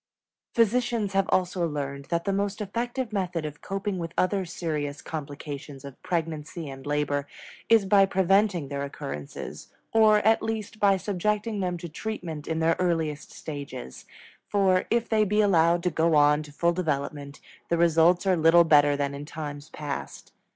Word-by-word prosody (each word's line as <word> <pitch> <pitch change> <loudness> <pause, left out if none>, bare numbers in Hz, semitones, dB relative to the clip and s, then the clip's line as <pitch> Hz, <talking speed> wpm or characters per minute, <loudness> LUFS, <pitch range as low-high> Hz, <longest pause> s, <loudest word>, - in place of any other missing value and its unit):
Physicians 230 -2 +1
have 195 0 +1
also 180 -1 +1
learned 140 -2 -4
that 170 +3 -2
the 200 - 0
most 200 +1 -1
effective 235 +3 -3
method 180 -5 -2
of 150 -1 -7
coping 195 -1 -3
with 165 -1 -5
other 190 +1 +1
serious 150 -4 -3
complications 145 -2 -7
of 140 -2 -11
pregnancy 165 -1 -3
and 135 +1 -10
labor 145 -1 0 0.4
is 225 -3 +5
by 195 0 +5
preventing 190 -3 +2
their 140 -1 -3
occurrence, 75 - -6 0.6
or 215 -1 +6
at 220 +1 +4
least 220 -1 -4
by 200 -2 +4
subjecting 210 +3 -1
them 180 -2 -1
to 170 0 -7
treatment 165 -4 -6
in 160 - -1
their 165 0 +2
earliest 160 -4 -1
stages; 140 - -8 0.4
for, 190 -3 +2
if 235 0 +1
they 220 -1 +3
be 210 +1 +1
allowed 170 -4 +4
to 180 - +1
go 160 +1 +2
on 150 0 +5
to 150 -1 -11
full 170 +4 +1
development, 145 -4 -3 0.3
the 170 - +2
results 170 +2 +4
are 190 -1 +4
little 165 +1 +6
better 145 -3 +5
than 140 -1 -1
in 140 +1 -6
times 145 -1 -7
past. 145 -2 -6
170 Hz, 165 wpm, -26 LUFS, 150-195 Hz, 0.6 s, or